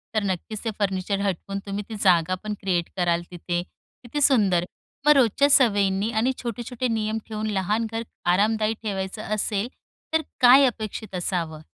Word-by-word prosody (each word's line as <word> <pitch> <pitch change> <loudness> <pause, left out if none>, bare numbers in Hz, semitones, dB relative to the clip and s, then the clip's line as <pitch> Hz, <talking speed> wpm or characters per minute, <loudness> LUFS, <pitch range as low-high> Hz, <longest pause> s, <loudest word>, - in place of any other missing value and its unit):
तर 215 - +2
नक्कीच 200 +2 -3
ते - - +1
फर्निचर 195 0 -1
हटवून 195 0 -2
तुम्ही 200 +1 -4
ती 220 - -5
जागापण 185 +3 +2
क्रिएट 180 -3 -1
कराल 175 -1 +1
तिथे. 175 0 -3 0.4
किती 270 +5 -4
सुंदर. 200 -11 +4 0.4
मग 300 - +7
रोजच्या 275 +2 +4
सवयींनी 205 -5 +3
आणि 235 +3 +1
छोटे-छोटे 240 +2 -3
नियम 220 -1 -1
ठेवून, 215 -1 -4
लहान 210 +2 0
घर 225 0 -3 0.3
आरामदायी 215 +3 +2
ठेवायचं 195 0 -4
असेल, 210 0 -1 0.5
तर 320 - +3 0.2
काय 255 +3 +8
अपेक्षित 220 -3 -5
असावं? 170 -4 -2
210 Hz, 150 wpm, -24 LUFS, 190-225 Hz, 0.5 s, काय